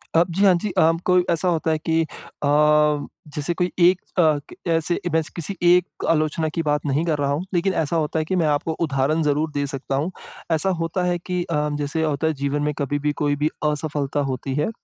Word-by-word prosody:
अ, 165 - +6
जी, 190 +4 0
हाँ 190 - +7
जी 210 - -2
अ, 160 - +5
कोई 180 -1 +4
ऐसा 170 +2 +1
होता 165 -2 +1
है 155 - +1
कि 160 +1 0
अ, 150 -1 -7 0.9
जैसे 150 +3 -1
कोई 180 +1 -1
एक 180 +1 +5 0.2
अ, 155 -4 +4 0.3
ऐसे 165 +1 +1
मैं 160 - +3
किसी 180 +3 -3
एक 180 +1 +3
आलोचना 155 0 +1
की 165 - +1
बात 150 -1 0
नहीं 145 +4 0
कर 155 -3 0
रहा 140 -1 0
हूँ। 155 +6 -2
लेकिन 185 +2 +1
ऐसा 155 - -2
होता 160 0 0
है 155 - -1
कि 185 - -1
मैं 170 -4 +2
आपको 150 +2 0
उदाहरण 140 +4 +1
ज़रूर 150 +1 0
दे 145 0 -1
सकता 135 0 -3
हूँ। 155 +7 -1 0.4
ऐसा 165 +4 +2
होता 165 +2 -1
है 175 0 +1
कि 180 -3 -1
अ, 150 -3 -1
जैसे 150 +3 -1
होता 155 0 0
है 160 - +1
जीवन 145 +1 0
में 150 0 0
कभी 145 +1 -1
भी 150 +1 0
कोई 145 -1 +2
भी 150 +2 0 0.2
असफलता 145 -1 -2
होती 130 +2 -4
है। 150 +5 0
155 Hz, 220 wpm, -22 LUFS, 145-170 Hz, 0.9 s, हाँ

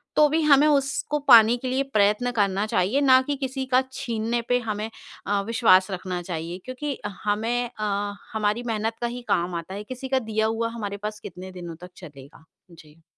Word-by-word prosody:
तो 300 - +6
भी 320 +2 +1
हमें 295 0 +6
उसको 280 +1 0
पाने 230 +1 +8
के 255 +1 -6
लिए 260 +2 0
प्रयत्न 215 -1 +1
करना 200 -3 +1
चाहिए 205 +9 +1
ना 260 -2 +6
कि 290 - 0
किसी 265 -1 -4
का 255 0 +3
छीनने 235 -1 -2
पे 245 - +3
हमें 215 -2 -4 0.4
अ, 200 0 +1
विश्वास 220 -5 +4
रखना 185 -1 -4
चाहिए 170 0 -5
क्योंकि 265 +2 -4 0.3
हमें 230 +4 0
अ, 205 -1 -1 0.2
हमारी 215 +2 0
मेहनत 225 0 -2
का 240 - 0
ही 245 +1 -6
काम 175 0 0
आता 170 +3 -5
है, 205 - -6
किसी 255 +4 -7
का 265 0 +2
दिया 220 -2 -1
हुआ 225 +1 -1
हमारे 210 -3 -5
पास 210 +1 -6
कितने 185 +1 -9
दिनों 175 -2 -8
तक 180 - -9
चलेगा। 145 -2 -13 0.3
जी। 160 -1 -18
220 Hz, 190 wpm, -24 LUFS, 190-255 Hz, 0.4 s, पाने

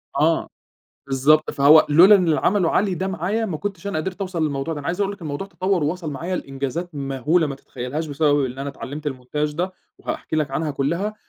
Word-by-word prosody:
آه. - - +2 0.6
بالضبط، 140 +3 +3
فهو 150 +2 +6
لولا 175 +8 +8
إن 190 -3 +4
اللي 155 - +2
عمله 185 -3 +2
علي 195 -1 +1
ده 185 +2 -2
معايا 195 +5 -1
ما 175 -7 -3
كنتش 200 0 -5
أنا 200 -6 -1
قدرت 185 +5 -4
أوصل 185 -4 -2
للموضوع 145 +2 -2
ده. 150 - -5
أنا 145 - -8
عايز 175 +3 -2
أقول 200 0 +1
لك 200 - -12
الموضوع 155 +4 -4
تطوّر 185 -4 -1
ووصل 165 +1 -2
معايا 170 +7 -3
لإنجازات 140 +5 -4
مهولة 140 +4 +1
ما 140 - -4
تتخيلهاش 135 +4 -5
بسبب 145 -1 +2
إن 130 0 -5
أنا 140 +1 -3
اتعلّمت 145 +2 -5
الmontage 145 +3 -3
ده، 180 +4 -2 0.3
وهاحكي - - -4
لك 150 -3 0
عنها 155 +3 -1
كُلها، 170 +10 -1
155 Hz, 205 wpm, -22 LUFS, 140-185 Hz, 0.6 s, لولا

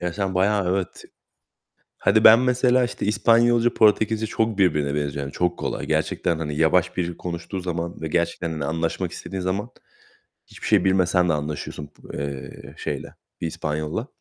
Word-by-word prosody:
Ya, 90 -1 -2
sen 95 -1 -2
bayağı 95 -1 +2
evet, 95 -2 -3 0.9
hadi 110 +2 +3
ben 115 +2 +9
mesela, 125 0 +3
işte, 120 - -3
İspanyolca, 115 +3 +3
Portekizce 110 +1 +3
çok 110 -1 -1
birbirine 75 -7 +2
benziyor 70 -1 -2
yani 70 - -6
çok 90 +2 -1
kolay. - - -3
Gerçekten, 85 - 0
hani, 75 -2 -3
yavaş 90 +3 +2
biri 85 -1 -2
konuştuğu 85 +2 -5
zaman 85 -2 -4
ve 80 - -2
gerçekten, 85 +1 -1
hani, 75 -3 -3
anlaşmak 80 +1 -2
istediğin 95 -1 -6
zaman 95 +5 -2 0.8
hiçbir - - -8
şey - - +3
bilmesen 90 -1 +3
de 80 - +3
anlaşıyorsun 75 0 -4
b - - -8
eee, 70 -2 -7
şeyle - - -5 0.3
bir 85 - -1
İspanyol'la. 80 - -3
90 Hz, 160 wpm, -23 LUFS, 80-105 Hz, 0.9 s, ben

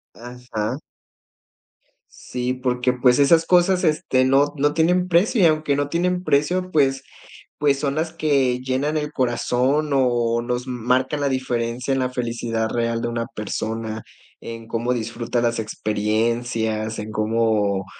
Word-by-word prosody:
Ajá. 120 0 -5 1.3
Sí, 125 0 -4
porque, 125 0 0
pues, 125 +1 +3
esas 165 +3 +5
cosas, 180 +1 +3
este, 150 -5 +2
no 140 +2 +3
no 145 +1 +2
tienen 180 +3 +2
precio 185 +6 +2
y, - - +6
aunque 155 -3 +2
no 145 0 0
tienen 180 +2 0
precio, 180 +5 +1
pues 135 -4 +2 0.6
pues, 140 -2 +2
son 140 -1 -1
las 160 +1 -2
que 140 -6 +1
llenan 130 +4 -1
el 150 -1 -2
corazón 130 +3 0
o 120 -3 +1
nos 125 +1 -3
marcan 130 +3 0
la 140 - +1
diferencia 125 -1 -2
en 135 - +1
la 130 0 -1
felicidad 115 -2 -2
real 115 0 -1
de - - -2
una 115 0 -3
persona, 110 +1 -4 0.4
en 115 -1 -8
cómo 115 +2 -1
disfruta 120 +1 -2
las 120 -1 0
experiencias, 110 +1 -1
en 105 0 -5
cómo 110 -2 +1
125 Hz, 145 wpm, -22 LUFS, 115-145 Hz, 1.3 s, y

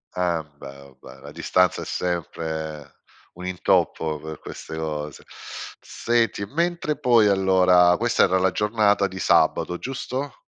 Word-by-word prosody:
Ambè, 75 -6 -4
u 65 - -24
beh, - - -14
la - - -10
distanza 90 -2 +1
è - - -8
sempre 80 -3 -4 0.4
un 90 +1 -9
intoppo 80 -3 0
per 80 0 -8
queste - - -9
cose. 75 -2 -5 0.6
Senti, 115 -3 -1
mentre 170 - -1
poi 115 -4 +4
allora 95 -2 +4
questa 120 +1 +2
era 95 - +3
la 95 0 +2
giornata 105 0 +2
di 95 0 -8
sabato, 90 -1 +2
giusto? 135 - -5
90 Hz, 130 wpm, -23 LUFS, 80-105 Hz, 0.6 s, poi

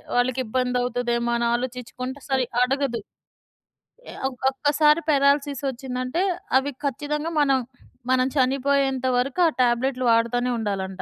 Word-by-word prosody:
వాళ్ళకి 245 +1 +1
ఇబ్బందౌతదేమో 245 0 -1
అని 235 0 0
ఆలోచిచ్చుకుంట 250 +1 -4
సరిగ్గా 255 -2 -1
అడగదు. 270 -2 -1 1.1
ఆహ్, - - -10
ఒ - - -1 0.2
ఒక్కసారి 300 +3 +3
పారాలిసిస్ 280 -1 +2
ఒచ్చిందంటే 255 +5 -3 0.4
అవి 285 +2 -4
ఖచ్చితంగా 300 +4 -2
మనం 270 -2 +3 0.5
మనం 255 0 +3
చనిపోయేంత 270 0 +1
వరకు 265 +6 -1
ఆ - - +4
టాబ్లెట్‌లు 250 +1 +1
వాడతానే 235 +2 +2
ఉండాలంట. 195 -3 -3
255 Hz, 115 wpm, -24 LUFS, 245-275 Hz, 1.1 s, ఆ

